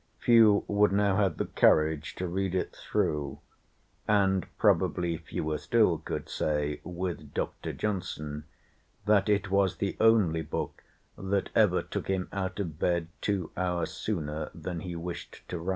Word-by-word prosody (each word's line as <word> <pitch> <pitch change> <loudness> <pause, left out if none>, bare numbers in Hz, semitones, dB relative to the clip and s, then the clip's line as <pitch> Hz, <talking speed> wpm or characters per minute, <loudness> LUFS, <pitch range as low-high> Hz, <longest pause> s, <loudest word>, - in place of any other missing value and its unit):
Few 110 -4 +5
would 105 0 +3
now 100 -1 +2
have 95 -6 +1
the - - -1
courage 80 0 +2
to 90 - -3
read 95 +1 -1
it 90 - -2
through, 75 -2 -1 0.7
and 95 -4 +2
probably 85 -2 +2
fewer 75 -1 -3
still 105 -9 +3
could 80 - -5
say 75 -1 -1
with 85 -4 -5
Dr. - - -3
Johnson 75 -7 -3 0.6
that 105 -1 +3
it 100 -1 +1
"was 100 -1 +3
the 100 - -2
only 105 -8 +4
book 80 0 -4 0.4
that 95 0 -1
ever - - +4
took - - -5
him 95 -1 -1
out 95 -1 -3
of 80 -6 -4
bed 85 -2 +1
two 95 -5 -1
hours 90 -2 -1
sooner 75 -6 -3
than 85 +1 -5
he 85 +1 -6
wished 85 +1 -7
to 90 - -3
rise." 85 +3 -4
90 Hz, 150 wpm, -29 LUFS, 80-100 Hz, 0.7 s, Few